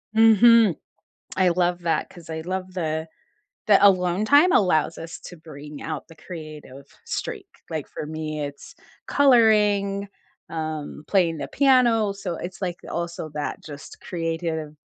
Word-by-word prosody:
Mhm. 225 -3 +6 0.6
I 185 -1 +4
love 175 0 0
that 165 -1 -1
'cause 170 -2 -14
I 160 0 -4
love 185 +1 -5
the 160 -2 -2 0.6
that 200 -2 +6
alone 185 0 +4
time 290 +9 +5
allows 165 - +2
us 165 0 -8
to 175 - -11
bring 150 -2 -11
out 155 -3 -5
the 165 - -15
creative 155 -6 -10 0.2
streak. - - -4 0.2
Like, 155 -3 -4
for - - -7
me, 155 -1 -5
it's 145 0 -9 0.3
coloring, 210 -6 +3 0.4
um, 155 -2 -5
playing 170 -5 +2
the - - -5
piano, 245 -6 +3
so 195 -3 -5
it's 175 +2 -7
like 180 -2 -3
also 170 -2 -4
that 150 0 -5
just 145 -1 -11
creative 165 -3 -4
175 Hz, 140 wpm, -24 LUFS, 155-200 Hz, 0.6 s, Mhm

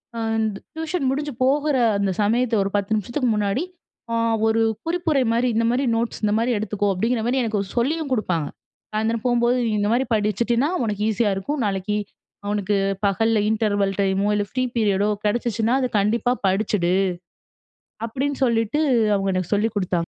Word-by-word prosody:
அ - - -3 0.2
இந் 220 0 +1 0.3
டியூஷன் 320 -3 -2
முடிஞ்சு 290 0 -3
போகுற 290 +2 +2 0.2
அந்த 200 -1 +1
சமயத்த 230 +3 +2
ஒரு 195 - -3
10 200 +2 0
நிமிஷத்துக்கு 240 +5 -1
முன்னாடி, 210 - 0 0.5
அ - - +1 0.3
ஒரு 225 +1 +2 0.3
குறிப்புரைமாரி 270 -9 +1
இந்தமாரி 230 +4 +1
நோட்ஸ் 230 0 -2
இந்தமாரி 220 +4 +1
எடுத்துக்கோ! 205 -1 -1
அப்பிடிங்கிறமாரி 235 +5 0
எனக்கு 215 -3 -1 0.2
சொல்லியும் 290 +4 0
குடுப்பாங்க. 175 - -1 0.5
சாயந்திரம் 220 +2 -1
போம்போது 240 +1 +2
நீ - - 0
இந்தமாரி 230 +6 +1
படிச்சிட்டீன்னா, 235 - +1 0.2
உனக்கு 210 -1 -3
ஈஸியா 215 0 +1
இருக்கும், 285 +8 -3
நாளைக்கி, 200 +1 -1 0.5
அவனுக்கு 205 0 0 0.3
பகல்ல 225 +3 +2
இன்டர்வல் 205 -3 +1
டைமோ 195 +1 +1
இல்ல 205 0 0
ஃப்ரீ 255 0 0
பீரியடோ 205 -2 +2 0.2
கிடைச்சுச்சுனா, 230 +1 0
அது 255 - +1
கண்டிப்பா 230 +4 +1 0.2
படிச்சிடு," 190 -2 +1 1.1
அப்பிடின்னு 270 +4 -3
சொல்லிட்டு 230 +4 +1 0.4
அவுங்க 195 -1 0
எனக்கு 185 +2 -1
சொல்லிக் 215 +1 0
குடுத்தாங்க. 185 -2 -1
225 Hz, 145 wpm, -22 LUFS, 205-245 Hz, 1.1 s, போகுற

